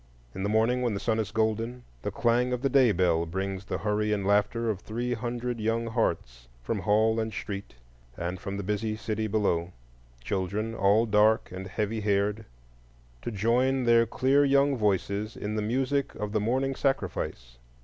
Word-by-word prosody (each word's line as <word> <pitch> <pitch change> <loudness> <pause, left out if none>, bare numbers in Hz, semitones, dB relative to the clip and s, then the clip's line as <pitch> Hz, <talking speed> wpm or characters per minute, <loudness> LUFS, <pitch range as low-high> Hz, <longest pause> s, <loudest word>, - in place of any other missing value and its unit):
In - - -6
the 100 - 0
morning, 115 +4 +2
when 120 -4 0
the - - -2
sun 110 +1 0
is 110 - -1
golden, 115 +3 -1 0.2
the - - -2
clang 125 +1 +1
of 125 +1 -3
the 135 - +3
day 130 -4 +5
bell 85 -3 +2
brings 95 +2 -3
the - - -3
hurry 105 0 0
and 100 -2 0
laughter 105 +3 +2
of 105 -4 -1
three 120 +4 -3
hundred 120 +1 -3
young 115 +2 0
hearts 60 - -2 0.2
from 105 - -2
hall 110 +2 +2
and 110 0 -2
street, 100 - -6 0.4
and 90 +1 -3
from 100 +1 -5
the 100 - -4
busy 105 +2 -1
city 110 0 -2
below,—children 85 - -3
all 105 +2 +3
dark 105 -1 +3
and 95 +1 -6
heavy 105 +2 -2
haired,—to - - -4
join 125 +5 +1
their 115 -1 +4
clear 130 +4 +3
young 140 0 +3
voices 105 0 -1
in 105 +1 -3
the 110 - 0
music 130 +5 0
of 105 -1 -4
the 105 -1 0
morning 130 +5 0
sacrifice. 90 - -2
105 Hz, 170 wpm, -28 LUFS, 95-115 Hz, 0.4 s, day